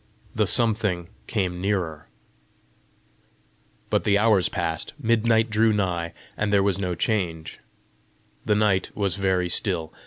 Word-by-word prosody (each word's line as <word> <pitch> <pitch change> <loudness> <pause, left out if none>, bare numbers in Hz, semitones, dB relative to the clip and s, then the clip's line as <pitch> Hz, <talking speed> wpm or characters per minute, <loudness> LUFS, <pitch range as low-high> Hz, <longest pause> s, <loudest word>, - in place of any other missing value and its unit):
The - - +1
something 105 -7 +1 0.2
came 90 -5 -2
nearer. 90 -7 -2 1.8
But - - +2
the 100 -1 +3
hours 105 -3 +3
passed, 80 -3 -2
midnight 115 -2 +2
drew 110 +1 +3
nigh, 90 -5 -1 0.2
and 105 -1 -1
there 100 -1 +4
was 100 -1 +1
no 90 -2 -2
change. 85 -4 -2 0.8
The 105 - +1
night 105 -3 +1
was 100 -4 0
very 95 -2 0
still. 85 -3 -1
100 Hz, 125 wpm, -24 LUFS, 90-105 Hz, 1.8 s, there